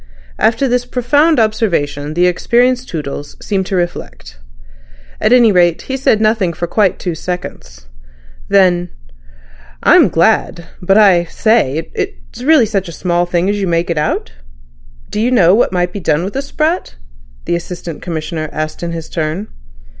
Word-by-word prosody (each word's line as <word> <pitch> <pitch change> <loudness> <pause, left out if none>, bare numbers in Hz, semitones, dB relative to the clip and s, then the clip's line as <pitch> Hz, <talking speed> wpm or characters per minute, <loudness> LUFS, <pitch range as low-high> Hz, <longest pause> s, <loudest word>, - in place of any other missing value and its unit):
After 230 +4 +2
this 250 0 +1
profound 285 +6 +2
observation 155 -10 -1
the 175 +1 +3
experienced 245 +8 +1
Toodles 145 -2 -6
seemed 190 -3 -2
to 195 - -2
reflect. 175 - -5 0.8
At - - +1
any 240 -3 +6
rate 175 -3 +2
he 265 - -4
said 260 -5 +2
nothing 215 -5 +1
for 175 - -3
quite 200 +1 +1
two 175 - -3
seconds. 105 - -7 0.6
Then: 180 -3 +3 0.9
"I'm - - +6
glad. 170 - +1 0.2
But—I 195 -2 +4
say—is 165 - 0
it - - -6
really 295 -4 +5
such 200 -4 -2
a - - -7
very 160 - -11
small 175 -1 0
thing 175 +1 0
as 205 0 -1
you 195 - -1
make 170 0 0
it 165 - -2
out?" 150 - -2 0.8
"Do 210 - -2
you 235 - +2
know 190 -8 +4
what 225 - +2
may 180 -1 +1
be 180 +3 -7
done 160 -2 0
with 195 +5 -5
a 275 - -1
sprat?" 310 +5 -2 0.5
the - - 0
Assistant 170 -1 -7
Commissioner 155 -2 -4
asked 155 0 -5
in 170 -1 -4
his 165 -1 -6
turn. 165 +5 -3
180 Hz, 160 wpm, -15 LUFS, 165-220 Hz, 0.9 s, any